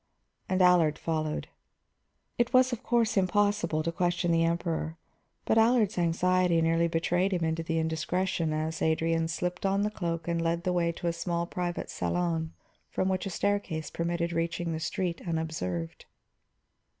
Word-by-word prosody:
And 185 0 +3
Allard 175 -4 +5
followed. 155 -2 -2 0.9
It 240 +1 +1
was, 255 0 +5
of 240 - -4
course, 235 -4 +1
impossible 195 -4 +2
to 165 - -1
question 175 0 0
the 165 0 +3
Emperor, 165 -1 -1 0.5
but 225 - +3
Allard's 225 -2 +3
anxiety 180 +1 +2
nearly 165 +1 +2
betrayed 175 +3 +1
him 175 -3 0
into 160 0 0
the 165 0 -2
indiscretion 160 +1 -1
as 155 +1 -2
Adrian 165 +1 +1
slipped 180 +2 -3
on 195 +1 +2
the 210 - 0
cloak 170 -5 -3
and 170 -1 0
led 170 +1 0
the 180 -1 0
way 170 -1 +1
to 170 +2 -8
a 170 - +1
small 170 0 -2
private 175 0 -4
salon 165 -2 -1 0.4
from 185 - 0
which 190 +1 -1
a - - -3
staircase 185 -5 -1
permitted 170 0 -1
reaching 170 +1 -1
the 160 - -3
street 170 +1 -2
unobserved. 155 - -3
170 Hz, 160 wpm, -29 LUFS, 165-185 Hz, 0.9 s, Allard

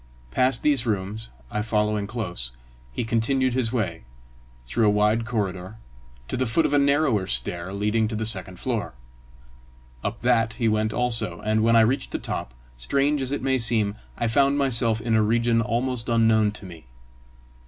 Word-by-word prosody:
Past 130 - +2
these 140 -5 +2
rooms, 105 +1 -3 0.2
I 105 - -1
following 105 -1 0
close, 90 - -4 0.4
he - - -3
continued 120 +3 0
his 125 -3 0
way, 95 -10 -2 0.6
through 105 - +1
a - - +5
wide 105 +2 +1
corridor, 100 -3 -3 0.5
to - - -4
the 130 0 -1
foot 160 +9 +1
of - - 0
a 145 - +4
narrower 140 -8 +2
stair 90 -3 -2
leading 105 +3 0
to 110 - -4
the 110 +1 -2
second 95 -4 +1
floor. 115 - -3 1.1
Up 105 +3 -4
that 115 -3 +2
he 120 0 -1
went 110 0 +1
also, 115 -8 +3
and 110 +1 +1
when 115 +1 +3
I 115 - +7
reached 130 +5 +1
the - - 0
top, - - -5 0.2
strange 140 - 0
as 130 0 0
it 145 - -3
may 130 -1 +1
seem, 110 -3 +1 0.2
I 120 - -1
found 140 +4 +2
myself 115 -5 +1
in 115 0 -1
a 110 - +4
region 115 +2 +2
almost 120 +1 -1
unknown 110 -2 +3
to 105 - -10
me. 85 -7 -12
115 Hz, 175 wpm, -24 LUFS, 105-125 Hz, 1.1 s, I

